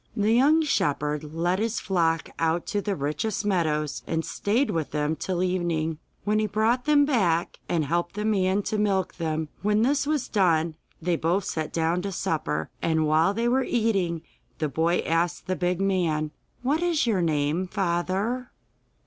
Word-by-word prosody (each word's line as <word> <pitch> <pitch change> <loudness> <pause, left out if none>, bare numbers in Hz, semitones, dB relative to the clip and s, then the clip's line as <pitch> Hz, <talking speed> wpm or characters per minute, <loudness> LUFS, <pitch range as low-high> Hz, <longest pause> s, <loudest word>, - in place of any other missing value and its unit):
The 210 +1 +3
young 295 +7 +5
shepherd 150 - 0
led 175 +4 0
his 225 +1 -1
flock 165 -4 0
out 165 +1 +1
to 205 - -1
the 200 -1 -1
richest 175 +9 -2
meadows 155 -7 0
and 165 0 -1
stayed 235 +7 0
with 160 -3 -2
them 150 +1 -1
till 180 +2 -2
evening, 170 -4 -1 0.2
when 210 +1 +1
he 215 - +1
brought 225 +4 +1
them 295 -1 +5
back, 180 - +1
and 160 -3 +1
helped 170 +5 -1
the 210 0 -2
man 195 -2 +2
to 215 - -1
milk 195 -3 0
them. 160 -2 -2
When 210 +2 +2
this 280 +3 +1
was 300 -4 0
done, 170 -5 +2 0.3
they 175 -1 +1
both 175 +5 +1
sat 155 -2 -3
down 165 +2 0
to 195 +1 -3
supper, 80 - -2
and 160 -1 +1
while 160 +6 +3
they 230 +2 0
were 260 +2 +2
eating 195 -10 0 0.3
the 155 - -1
boy 165 +5 +1
asked 170 +2 0
the 185 0 -1
big 180 0 0
man: 170 -6 0 0.3
'What 290 +6 +1
is 340 -5 +2
your 210 -6 +1
name, 155 +2 0
father? 195 +6 -1
180 Hz, 175 wpm, -26 LUFS, 160-215 Hz, 0.3 s, young